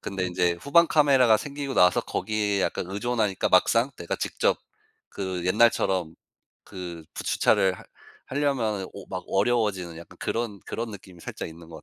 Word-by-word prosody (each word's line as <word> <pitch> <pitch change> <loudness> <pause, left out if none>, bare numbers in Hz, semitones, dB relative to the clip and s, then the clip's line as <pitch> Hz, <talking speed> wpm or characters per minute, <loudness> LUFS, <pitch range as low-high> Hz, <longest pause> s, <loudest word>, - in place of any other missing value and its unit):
근데 95 -2 -3
인제 90 -1 +1
후방 170 +4 +5
카메라가 135 -8 +5
생기고 140 0 -5
나서 90 0 +5
거기에 105 -2 -1
약간 - - -1
의존하니까 105 -1 0
막상 115 +8 +4
내가 85 - -3
직접 - - 0 0.5
그 95 -3 -4
옛날처럼 95 -5 +2 0.5
그 85 -4 -8
푸 - - -5
주차를 95 -1 +3
하 - - -12 0.4
하려면은 125 -9 -1
오 100 - -9
막 95 -1 -5
어려워지는 100 -5 0
약간 85 - -13
그런 115 -4 -3
그런 115 0 -4
느낌이 95 -3 -12
살짝 - - -6
있는 80 0 -13
것 80 - -11
100 Hz, 340 characters per minute, -26 LUFS, 90-120 Hz, 0.5 s, 후방